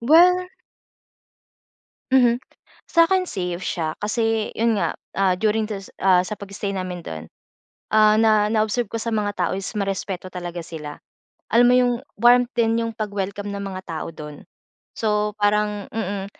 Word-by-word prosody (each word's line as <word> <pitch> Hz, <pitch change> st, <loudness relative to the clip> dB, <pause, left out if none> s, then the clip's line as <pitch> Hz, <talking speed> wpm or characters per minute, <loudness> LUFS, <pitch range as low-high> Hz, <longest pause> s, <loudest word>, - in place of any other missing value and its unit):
Well 355 Hz, +8 st, +5 dB, 1.6 s
Mhm. 245 Hz, -2 st, +5 dB, 0.5 s
Sa'kin 365 Hz, +2 st, +3 dB
safe 180 Hz, -, -3 dB
siya, 160 Hz, -3 st, -3 dB
kasi, 225 Hz, +1 st, -1 dB
'yon 225 Hz, -2 st, +1 dB
nga, -, -, 0 dB, 0.2 s
ah, 190 Hz, -2 st, +3 dB
during 215 Hz, +3 st, +1 dB
du 210 Hz, -, -4 dB, 0.2 s
ah, 185 Hz, -2 st, +4 dB
sa 205 Hz, +3 st, -6 dB
pag-stay 200 Hz, 0 st, -5 dB
namin 185 Hz, -2 st, -4 dB
do'n, 80 Hz, -, -7 dB, 0.6 s
ah, 215 Hz, -1 st, +5 dB
na 215 Hz, -2 st, +4 dB
na-observe 220 Hz, +2 st, +1 dB
ko -, -, -13 dB
sa 230 Hz, -, -2 dB
mga 205 Hz, -1 st, 0 dB
tao -, -, +1 dB
is, 195 Hz, -, -5 dB
marespeto 195 Hz, -2 st, -3 dB
talaga 175 Hz, -1 st, -6 dB
sila. 150 Hz, -3 st, -8 dB, 0.5 s
Alam 240 Hz, +2 st, +5 dB
mo -, -, +5 dB
yung, 245 Hz, -1 st, +3 dB, 0.2 s
warmth 245 Hz, +2 st, +5 dB
din, 230 Hz, -1 st, +2 dB
yung 230 Hz, 0 st, -3 dB
pag-welcome 205 Hz, -2 st, -4 dB
ng 200 Hz, -, -4 dB
mga 190 Hz, -1 st, -5 dB
tao 160 Hz, -2 st, -5 dB
do'n. 150 Hz, -2 st, -9 dB, 0.5 s
So, 210 Hz, -1 st, 0 dB
parang 210 Hz, 0 st, +1 dB
mm, 200 Hz, -3 st, -3 dB
210 Hz, 150 wpm, -22 LUFS, 190-230 Hz, 1.6 s, Well